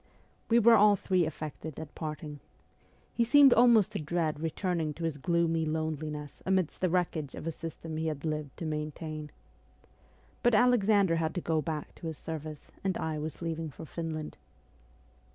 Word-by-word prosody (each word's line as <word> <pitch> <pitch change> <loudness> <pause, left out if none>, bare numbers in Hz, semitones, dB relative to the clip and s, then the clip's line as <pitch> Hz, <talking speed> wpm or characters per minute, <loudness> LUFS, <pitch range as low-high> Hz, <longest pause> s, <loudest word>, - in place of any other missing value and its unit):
We 230 - +5
were 235 0 +7
all 210 -1 +7
three 185 -3 +1
affected 155 0 -6
at 160 -2 -8
parting. 150 -2 -6 0.7
He 235 - +2
seemed 270 +2 +7
almost 235 -4 +5
to - - -3
dread 155 -1 -1
returning 165 -1 -1
to 170 - -7
his 160 -3 -2
gloomy 165 +1 +1
loneliness 155 -2 -3
amidst 185 -4 0
the 185 - +2
wreckage 165 -5 -1
of - - -7
a 165 - -1
system 165 0 -7
he 160 0 -1
had 150 -1 -3
lived 150 -3 -3
to 165 - -5
maintain. 155 0 -4 1.1
But 240 -2 +4
Alexander 210 -6 +4
had 160 -1 -1
to 180 - -1
go 160 -1 0
back 150 0 -4
to 165 - -8
his 160 -2 -5
service, 155 -2 -7
and 190 -2 0
I 155 -1 -2
was 155 +2 -5
leaving 165 -1 -3
for 155 +3 -10
Finland. 160 -1 -5
160 Hz, 170 wpm, -30 LUFS, 155-180 Hz, 1.1 s, were